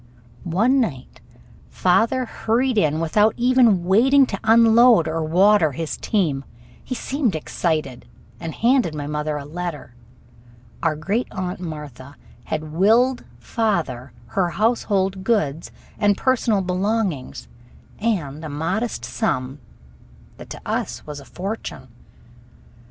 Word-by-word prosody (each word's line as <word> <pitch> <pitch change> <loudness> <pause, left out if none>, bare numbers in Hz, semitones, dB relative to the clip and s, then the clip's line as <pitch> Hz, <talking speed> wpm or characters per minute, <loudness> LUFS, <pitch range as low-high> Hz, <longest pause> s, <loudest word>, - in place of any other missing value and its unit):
One 225 +11 +2
night 145 - -4 0.5
father 225 +7 +2
hurried 240 +3 0
in 155 -2 +1
without 210 +7 +2
even 240 -6 +4
waiting 265 +9 +5
to 195 -6 -5
unload 230 -3 +6
or 160 +1 -2
water 175 0 +4
his 160 +3 -4
team. 155 -10 -1 0.4
He 255 - -5
seemed 260 - -1
excited, 155 - -2 0.3
and 165 -1 -6
handed 235 - +2
my 145 -1 -4
mother 150 0 -2
a 140 - -7
letter. 165 -4 -6 0.9
Our 165 -2 +1
Great 200 +11 -2
Aunt 185 -1 -4
Martha 150 -5 -8 0.3
had 155 0 -4
willed 230 +9 +3
father 160 - -2 0.2
her 185 -3 0
household 195 -2 0
goods 170 -8 0 0.3
and 205 -1 +3
personal 235 -6 +1
belongings 185 - -2 0.5
and 165 -10 -2
a 155 - -5
modest 165 - -2
sum 130 +2 -2 0.8
that - - -12
to - - -8
us - - -3
was 150 -1 -7
a 140 - -13
fortune. 195 +9 -6
185 Hz, 120 wpm, -22 LUFS, 155-225 Hz, 0.9 s, unload